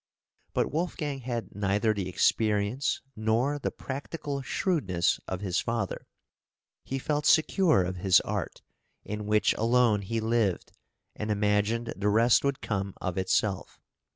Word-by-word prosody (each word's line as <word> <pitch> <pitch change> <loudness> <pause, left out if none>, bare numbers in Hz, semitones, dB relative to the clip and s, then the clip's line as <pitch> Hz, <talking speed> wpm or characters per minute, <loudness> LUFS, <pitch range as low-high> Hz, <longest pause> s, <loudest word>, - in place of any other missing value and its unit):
But - - +1
Wolfgang 150 -3 -2
had 120 -5 -4
neither 100 +2 +1
the 95 -3 -3
experience 105 +6 +1
nor 115 +7 0
the - - -1
practical 140 +1 -5
shrewdness 125 - 0
of 95 0 -4
his 95 -3 0
father; 115 -4 -3 0.8
he 135 - -3
felt 150 +2 -1
secure 160 - +4
of 90 +1 -4
his 90 0 +5
art, - - -4 0.4
in 105 0 -5
which 105 0 +3
alone 115 -2 +3
he 115 +4 -2
lived, 110 -4 0 0.4
and 105 - -4
imagined 105 +2 +1
the 105 +1 0
rest 115 +3 +4
would 140 -1 -1
come 100 -2 -3
of 95 - -2
itse(l)f. 95 +2 -1
110 Hz, 135 wpm, -28 LUFS, 100-130 Hz, 0.8 s, his